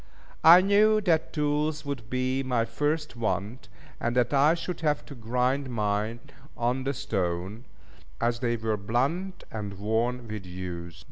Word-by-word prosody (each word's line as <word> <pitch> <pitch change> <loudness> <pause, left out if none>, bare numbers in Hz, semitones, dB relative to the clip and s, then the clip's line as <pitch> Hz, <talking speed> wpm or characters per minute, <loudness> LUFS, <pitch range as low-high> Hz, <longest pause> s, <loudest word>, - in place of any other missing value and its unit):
I 170 +3 +10
knew 210 +2 +4
that 165 -5 +1
tools 150 0 0
would 130 -6 -5
be 130 +1 0
my 125 -3 0
first 150 +5 -2
want, 110 -1 -3 0.3
and 120 +1 -1
that 125 +2 +2
I 145 +4 +5
should 175 0 -5
have 150 -2 0
to 145 - -10
grind 125 +3 0
mine 110 0 -1 0.4
on 125 +2 0
the 140 - 0
stone, 95 +2 -3 0.5
as 115 0 0
they 120 -2 0
were 110 -1 -1
blunt 140 - -1
and 100 -3 -5
worn 115 +4 -1
with 105 -2 -5
use. 90 -2 -7
125 Hz, 150 wpm, -27 LUFS, 110-150 Hz, 0.5 s, I